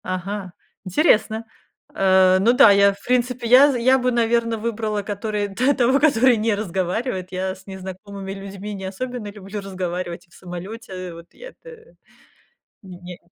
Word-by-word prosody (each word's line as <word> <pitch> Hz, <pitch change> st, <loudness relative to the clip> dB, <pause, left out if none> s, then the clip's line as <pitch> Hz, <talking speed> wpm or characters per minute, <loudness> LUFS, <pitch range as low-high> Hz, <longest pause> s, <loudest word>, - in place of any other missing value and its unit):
Ага, 185 Hz, 0 st, -5 dB, 0.3 s
интересно. 220 Hz, -, +2 dB, 0.5 s
Э, 190 Hz, -1 st, +4 dB
ну 225 Hz, +5 st, +4 dB
да, 230 Hz, -4 st, +7 dB
я, 200 Hz, 0 st, +5 dB
в 200 Hz, -, -18 dB
принципе, 250 Hz, -1 st, 0 dB
я 265 Hz, +5 st, +7 dB
з -, -, -3 dB
я 260 Hz, +2 st, +5 dB
бы, 250 Hz, 0 st, 0 dB
наверно, 235 Hz, -1 st, +1 dB
выбрала, 215 Hz, -1 st, -2 dB
который 205 Hz, +1 st, -3 dB
т 255 Hz, +8 st, +2 dB
того, 260 Hz, +1 st, +2 dB
который 255 Hz, -4 st, +4 dB
не 215 Hz, 0 st, 0 dB
разговаривает. 190 Hz, +1 st, -3 dB
Я 185 Hz, 0 st, -2 dB
с 190 Hz, -, -19 dB
незнакомыми 195 Hz, +1 st, -8 dB
людьми 195 Hz, +1 st, -8 dB
не 190 Hz, -1 st, -7 dB
особенно 235 Hz, +4 st, -5 dB
люблю 205 Hz, 0 st, -8 dB
разговаривать 180 Hz, -2 st, -5 dB
и -, -, -38 dB
в -, -, -22 dB
самолете. 185 Hz, 0 st, -8 dB
Вот 170 Hz, 0 st, -14 dB
я -, -, -11 dB
это, 485 Hz, -1 st, -16 dB, 0.9 s
не 185 Hz, -3 st, -11 dB
не 180 Hz, -1 st, -10 dB
205 Hz, 160 wpm, -21 LUFS, 190-235 Hz, 0.9 s, да